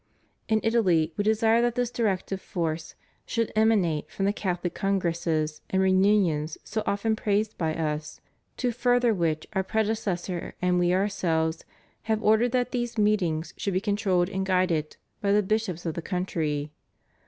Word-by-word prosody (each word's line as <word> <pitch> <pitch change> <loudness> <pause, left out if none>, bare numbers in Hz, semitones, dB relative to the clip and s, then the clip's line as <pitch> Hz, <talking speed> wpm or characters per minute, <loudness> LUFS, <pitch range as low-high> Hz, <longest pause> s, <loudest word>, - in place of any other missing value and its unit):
In 220 -1 +3
Italy 180 -9 +2
We 205 - 0
desire 220 +2 +3
that 240 -1 +1
this 245 -1 0
directive 195 -4 -1
force 160 -2 -3 0.3
should 230 -1 -1
emanate 205 -9 +2
from 195 - -2
the 200 - +2
CathoHc 180 -4 -2
Congresses 170 -5 -1
and 190 - +1
Reunions 185 -5 +2
so 220 +1 -3
often 220 +2 +1
praised 210 0 0
by 160 -2 -1
Us, 150 -1 -3 0.4
to 250 -1 0
further 245 0 +2
which 165 -5 -1
Our 190 - +1
predecessor 200 -4 -2
and 180 0 +2
We 175 0 +2
Ourselves 170 -4 0 0.4
have 220 0 +1
ordered 220 +3 +4
that 250 0 0
these 240 -1 -2
meetings 185 -7 +1
should 200 - -2
be - - +3
controlled 195 -3 +1
and 190 0 -2
guided 180 -5 0 0.2
by 200 - +1
the 210 0 +4
bishops 195 -4 -1
of 165 - -1
the 170 - -4
country. 160 -5 -2
190 Hz, 155 wpm, -26 LUFS, 170-220 Hz, 0.4 s, ordered